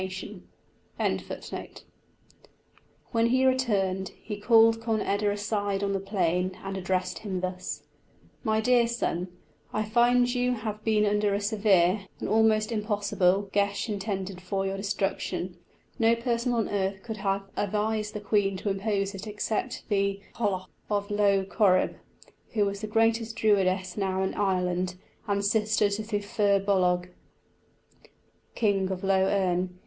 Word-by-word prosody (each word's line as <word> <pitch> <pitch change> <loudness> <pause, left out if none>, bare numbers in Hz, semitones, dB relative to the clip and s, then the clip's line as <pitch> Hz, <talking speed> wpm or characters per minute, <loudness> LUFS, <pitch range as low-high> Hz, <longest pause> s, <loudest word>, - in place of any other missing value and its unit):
When 230 0 +3
he 260 +2 +3
returned, 200 -8 +1
he 210 -2 -6
called 225 +1 +5
Conn 225 -1 0
eda 205 +1 0
aside 205 -1 -1
on 200 0 0
the 195 - 0
plain, 185 -2 0
and 195 0 -4
addressed 185 -1 -1
him 195 -4 -3
thus: 185 0 -4 0.6
"My 220 0 +1
dear 240 0 +4
son, 190 -7 -2 0.4
I 215 - 0
find 240 +3 +3
you 250 0 +1
have 215 -2 -5
been 215 -1 +3
under 210 -1 +2
a - - 0
severe 200 -2 +2
an - - -3
almost 220 0 +3
impossible 205 -3 +1
geis 200 +2 +1
intended 195 -2 -3
for 195 +1 -2
your 195 0 -1
destruction; 195 -2 -2 0.4
no 230 0 +4
person 235 +1 -1
on 230 -3 +1
earth 195 -1 -2
could 220 -2 -5
have 195 0 -1
advised 210 +1 -1
the - - -2
queen 200 -2 +1
to 200 +2 -2
impose 195 0 -1
it 195 +2 -7
except 215 +4 -3
the 200 -1 +1
Cailleach 200 -5 -1 0.2
of 205 0 -1
Lough 200 -2 +3
Corrib, 190 -1 +2 0.6
who 210 -3 +2
is 200 0 -6
the 215 - -3
greatest 225 +1 +1
Druidess 190 -4 +2
now 190 -1 0
in 190 - -1
Ireland, 180 -2 0 0.3
and 200 -1 0
sister 215 0 +2
to 205 +2 -1
the 210 -1 -2
Firbolg, 195 -3 +2 1.5
King 195 -4 +1
of 190 -1 -4
Lough 190 -1 +3
Erne. 180 -2 0
205 Hz, 140 wpm, -27 LUFS, 190-220 Hz, 1.5 s, called